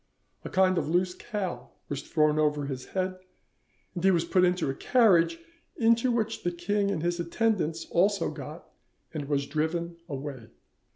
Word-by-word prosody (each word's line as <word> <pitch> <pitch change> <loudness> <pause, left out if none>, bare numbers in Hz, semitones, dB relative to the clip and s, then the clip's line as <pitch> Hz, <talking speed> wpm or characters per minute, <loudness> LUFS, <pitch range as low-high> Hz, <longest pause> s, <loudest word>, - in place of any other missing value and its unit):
A - - -6
kind 185 -1 +3
of - - -3
loose 180 +2 +1
cowl 195 -1 -5
was 145 -1 -3
thrown 155 -1 +2
over 150 -1 +1
his 130 -2 -5
head, 185 0 -2 0.7
and 175 -2 -5
he 195 - +6
was 170 -3 +2
put 185 - +3
into 180 -2 +2
a 135 - 0
carriage, 220 - +4 0.4
into 230 +2 +3
which 225 -2 -1
the 175 - 0
king 200 +4 0
and 170 -5 -2
his 175 0 0
attendants 170 -3 0
also 195 +2 +2
got, 150 +2 -9 0.5
and 150 -3 -3
was 140 -1 0
driven 165 +4 -2
away." 135 -4 -6
175 Hz, 165 wpm, -28 LUFS, 150-190 Hz, 0.7 s, he